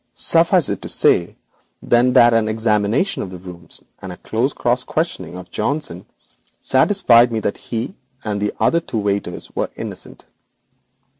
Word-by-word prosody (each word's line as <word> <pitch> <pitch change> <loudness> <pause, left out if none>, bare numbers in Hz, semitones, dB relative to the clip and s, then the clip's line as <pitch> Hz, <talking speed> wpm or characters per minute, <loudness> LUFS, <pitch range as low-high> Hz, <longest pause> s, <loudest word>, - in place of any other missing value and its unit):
Suffice - - +4
it - - -3
to - - -7
say - - +2 0.5
that 120 0 +4
an 115 -1 +2
examination 110 - 0
of 95 - -5
the 90 - -9
rooms 90 -1 -10 0.2
and 95 - -7
a 90 - -9
close 120 +6 -1
cross 125 0 0
questioning 95 - -3
of 90 -1 -11
Johnson 110 - -3 0.5
satisfied 130 - +4
me 115 - -1 0.2
he 120 +8 -5 0.3
and 105 -2 -3
the 135 +10 +1
two 115 - -3
waiters 100 -3 -3
were - - -1
innocent. - - -8
115 Hz, 140 wpm, -19 LUFS, 100-125 Hz, 0.5 s, Suffice